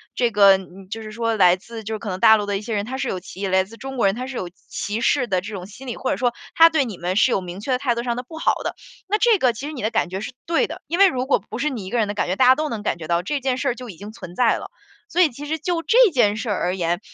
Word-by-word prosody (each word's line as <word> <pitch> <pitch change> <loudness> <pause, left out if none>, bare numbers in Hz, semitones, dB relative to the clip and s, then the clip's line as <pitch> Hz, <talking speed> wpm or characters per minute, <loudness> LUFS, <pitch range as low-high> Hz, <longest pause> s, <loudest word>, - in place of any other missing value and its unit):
这 240 -2 +1
个， 200 -2 +6
嗯， 190 0 -12
就 225 +2 -5
是 215 -1 -8
说 230 0 -1
来 180 -4 +5
自， 225 +4 -10
就 220 +1 -4
是 215 - -3
可 210 - -6
能 185 -1 -4
大 220 +3 +7
陆 205 - -2
的 205 -1 -1
一 - - -6
些 225 +1 -5
人， 205 -1 -1
他 260 +3 -5
是 270 0 -2
有 185 - -2
歧 190 +2 -7
来 190 0 +3
自 210 +4 -13
中 265 +3 -7
国 235 - +2
人 195 +1 +3
他 250 +2 -5
是 265 -2 -6
有 180 - -4
歧 205 +4 -5
视 250 0 +2
的 185 -4 0
这 210 +3 -8
种 185 -3 -6
心 215 +7 -12
理， 240 - -4
或 260 - -2
者 - - -1
说 245 -2 +1 0.2
他 330 0 +8
对 315 -4 +1
你 215 -6 -6
们， 180 +2 -2
是 245 +5 +4
有 195 - +1
明 180 +1 -7
确 230 +6 -4
的 255 - +3
态 250 -2 0
度 235 - -3
上 240 -1 -1
的 250 - -4
不 320 +6 -11
好 - - +2
的， - - -3 0.3
那 420 - +2
这 460 -1 +4
个 255 -5 +4
其 245 +5 -7
实 310 - -6
你 260 - -6
的 215 - 0
感 225 -6 0
觉 190 +2 -4
是 220 - -5
对 335 0 +1
的。 - - -8
因 340 +3 -2
为 395 - +8
如 255 -7 -1
果 270 - +2
不 225 - -5
是 300 - +1
你 235 -9 -5
一 - - -6
个 245 - -1
人 220 -3 +2
的 205 - -3
感 210 - -1
觉， 180 - 0
大 260 - +5
家 255 +1 +7
都 310 +1 -2
能 220 -5 -5
感 200 - -1
觉 160 -2 -8
到， 170 +1 +1
这 285 +9 -2
件 260 -1 0
事 275 +1 0
儿 240 - -1
就 250 -1 -9
已 180 - -10
经 205 +4 -9
存 175 -5 -10
在 240 0 +3
了。 - - -8 0.4
所 360 - +2
以 340 - +5
其 280 +3 -9
实 315 +2 -2
就 335 +2 -2
这 475 0 +5
件 210 -7 +3
事 220 +2 -4
儿 205 - 0
而 180 +1 0
言， 175 -1 -1
230 Hz, 380 characters per minute, -22 LUFS, 195-265 Hz, 0.4 s, 他